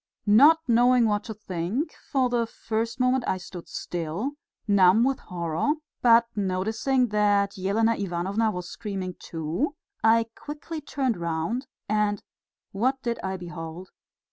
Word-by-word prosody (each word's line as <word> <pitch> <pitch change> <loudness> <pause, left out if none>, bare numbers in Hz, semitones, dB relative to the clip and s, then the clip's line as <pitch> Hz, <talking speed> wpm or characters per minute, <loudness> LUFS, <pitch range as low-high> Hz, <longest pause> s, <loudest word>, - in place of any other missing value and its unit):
Not 285 +10 +7
knowing 245 +1 +5
what 210 -1 +1
to 220 - -5
think, 195 - -3
for 265 -2 -1
the 240 -2 0
first 230 +2 -3
moment 255 0 +2
I 185 - +1
stood 180 -1 -9
still, 175 - -3 0.4
numb 200 +1 +5
with 265 +1 +1
horror, 170 - -1 0.3
but 235 -1 +6
noticing 220 +6 0
that 205 -1 +2
Elena 210 +4 +2
Ivanovna 195 +3 -1
was 180 -4 -5
screaming 195 -4 -5
too, 165 - -3 0.3
I 225 +1 +5
quickly 300 +2 -7
turned 265 -6 -1
round 170 - -2 0.2
and 210 -1 0 0.5
what 255 +7 0
did 235 -1 -2
I 190 0 -2
behold! 175 0 -8
210 Hz, 135 wpm, -26 LUFS, 185-245 Hz, 0.5 s, Not